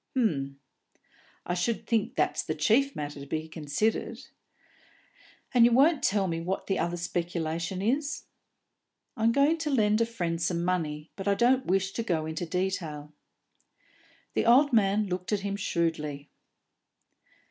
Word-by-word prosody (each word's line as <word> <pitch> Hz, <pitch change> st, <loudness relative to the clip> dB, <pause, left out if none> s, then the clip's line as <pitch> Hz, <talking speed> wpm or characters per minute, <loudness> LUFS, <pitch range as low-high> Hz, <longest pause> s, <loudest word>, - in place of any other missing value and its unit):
"H'm. 140 Hz, -, 0 dB, 0.9 s
I 180 Hz, -, -1 dB
should 180 Hz, +6 st, -1 dB
think 225 Hz, -3 st, 0 dB
that's -, -, +1 dB
the -, -, -3 dB
chief 275 Hz, +5 st, +2 dB
matter 145 Hz, -1 st, -5 dB
to 140 Hz, -, -9 dB
be 155 Hz, +2 st, -3 dB
considered. 170 Hz, +9 st, -1 dB, 1.4 s
And 245 Hz, -2 st, +6 dB
you 240 Hz, -, +6 dB
won't 280 Hz, +6 st, +4 dB
tell 195 Hz, -1 st, +2 dB
me 165 Hz, -1 st, -2 dB
what 185 Hz, +3 st, -3 dB
the 195 Hz, -, -1 dB
other 175 Hz, +1 st, -1 dB
speculation 170 Hz, +1 st, -3 dB
is?" 285 Hz, +7 st, 0 dB, 0.9 s
"I'm 225 Hz, -1 st, +2 dB
going 285 Hz, +6 st, +3 dB
to 310 Hz, -1 st, -2 dB
lend 215 Hz, -5 st, +3 dB
a 230 Hz, -, +2 dB
friend 175 Hz, -7 st, -3 dB
some 170 Hz, 0 st, 0 dB
money, 155 Hz, -4 st, -2 dB
but 195 Hz, 0 st, -6 dB
I 200 Hz, -, +3 dB
don't 255 Hz, +5 st, +3 dB
wish 195 Hz, +1 st, +1 dB
to 230 Hz, -, -3 dB
go 165 Hz, -8 st, -1 dB
into 160 Hz, +2 st, -4 dB
detail." 160 Hz, -5 st, -3 dB, 1.2 s
The -, -, 0 dB
old 270 Hz, +4 st, +6 dB
man 210 Hz, -1 st, +3 dB
looked 180 Hz, 0 st, -4 dB
at 205 Hz, -, 0 dB
him 200 Hz, 0 st, -2 dB
shrewdly. 155 Hz, -6 st, -2 dB
190 Hz, 150 wpm, -28 LUFS, 165-230 Hz, 1.4 s, And